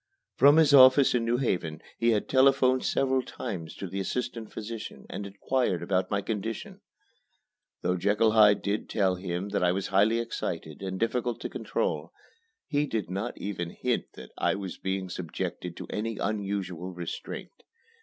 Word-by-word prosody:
From 145 +3 +7
his 155 -3 +5
office 130 0 +8
in 120 -2 +1
New 120 +1 +2
Haven 85 - -1 0.2
he 115 - +3
had 110 -3 +1
telephoned 130 -1 +4
several 130 -1 +2
times 95 -11 -6
to - - -6
the 95 +2 -4
assistant 115 +2 -3
physician 110 0 -7
and 100 - -5
inquired 100 -1 -1
about 95 -1 0
my 100 -1 0
condition. 110 0 -4 1.0
Though 90 - +1
Jekyll 105 +4 +3
Hyde 105 -2 +5
did 100 +1 -2
tell 95 -3 +2
him 90 +1 -4
that 100 - 0
I 90 - +4
was 95 +1 -2
highly 105 +4 +4
excited 85 -9 -4
and 95 -1 -4
difficult 120 +1 0
to - - -4
control, - - -2 0.5
he 145 0 0
did 110 -8 -3
not 100 +6 -3
even 90 -4 -4
hint - - 0
that - - -11
I - - +2
was 95 -2 -6
being 95 0 -2
subjected 90 0 -5
to - - -7
any 110 0 -3
unusual 100 -4 -3
restraint. 85 -2 -7
105 Hz, 165 wpm, -28 LUFS, 95-120 Hz, 1.0 s, office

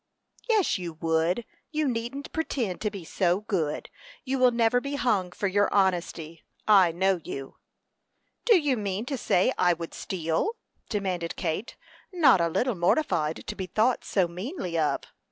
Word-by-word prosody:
"Yes, 420 - +3
you 175 -2 -5
would! 165 +6 0 0.2
You 310 -2 0
needn't 245 +4 -4
pretend 250 - -2
to 210 - 0
be 200 -5 -8
so 180 +3 +1
good. 170 -8 -2 0.3
You 265 0 -1
will 255 0 +6
never 235 +1 +2
be 280 +2 -4
hung 200 -9 +1
for 200 - -4
your 205 +2 +2
honesty. 175 -4 0 0.3
I 195 -5 +6
know 190 +1 +1
you." 135 -1 -7 0.9
"Do 460 -4 +6
you 290 -6 +1
mean 205 +1 -2
to 275 - -2
say 185 -7 +2
I 175 -1 +4
would 165 0 -7
steal?" 175 - -2 0.3
demanded 185 -5 -2
Kate, 180 +6 -3 0.4
not 315 - +5
a 170 - +2
little 245 +9 0
mortified 170 - 0
to - - -5
be 190 - -5
thought 230 +6 +1
so 190 -4 +1
meanly 180 - -5
of. 155 -2 +1
195 Hz, 160 wpm, -27 LUFS, 170-245 Hz, 0.9 s, will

